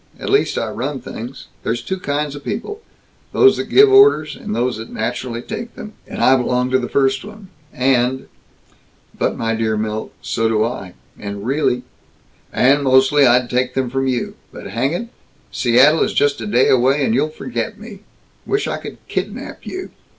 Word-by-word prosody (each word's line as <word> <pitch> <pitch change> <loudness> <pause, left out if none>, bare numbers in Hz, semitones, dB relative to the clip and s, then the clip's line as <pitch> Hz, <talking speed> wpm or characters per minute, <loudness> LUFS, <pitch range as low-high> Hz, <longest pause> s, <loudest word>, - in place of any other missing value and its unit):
At - - -4
least - - +2
I - - -1
run 135 +4 -3
things. 125 +3 -8 0.2
There's 120 +1 -2
two 190 +8 -3
kinds 145 -3 -2
of 145 - -9
people; 415 - -5 0.5
those 400 0 +5
that - - -2
give 410 0 +6
orders, 405 +2 +5
and 210 0 -5
those 125 -2 0
that 110 +1 -8
naturally 120 +1 -4
take 225 +3 -6
them; 215 - -9
and - - -4
I 130 - +6
belong 125 0 0
to 130 - +3
the 125 - -4
first 135 -1 +1
one, 210 -1 -12 0.2
and 130 0 +1 0.5
" - - -36
"But - - 0
my 115 0 -1
dear 110 -1 0
Milt, 110 0 -3
so 115 - -1
do 110 -1 +2
I, 100 - -5 0.2
and 100 0 -6
really 125 -2 0 0.4
" - - -37 0.2
"And 140 +3 +3
mostly 135 +1 +4
I'd 125 0 +4
take 125 +1 -1
them 130 -2 -1
from 135 0 0
you. 125 -2 -1 0.2
But - - -9
hang 130 +7 0
it, 230 +7 -4 0.4
Seattle 130 +6 +4
is - - +1
just 145 -4 +2
a 110 - -4
day 120 +5 +3
away, 135 +3 +3
and 110 - +1
you'll 145 +6 +1
forget 225 +5 -5
me. 215 -2 -10 0.4
Wish 410 +1 -1
I - - -2
could - - -9
kidnap - - -5
you. 370 0 -6
130 Hz, 190 wpm, -19 LUFS, 120-155 Hz, 0.5 s, give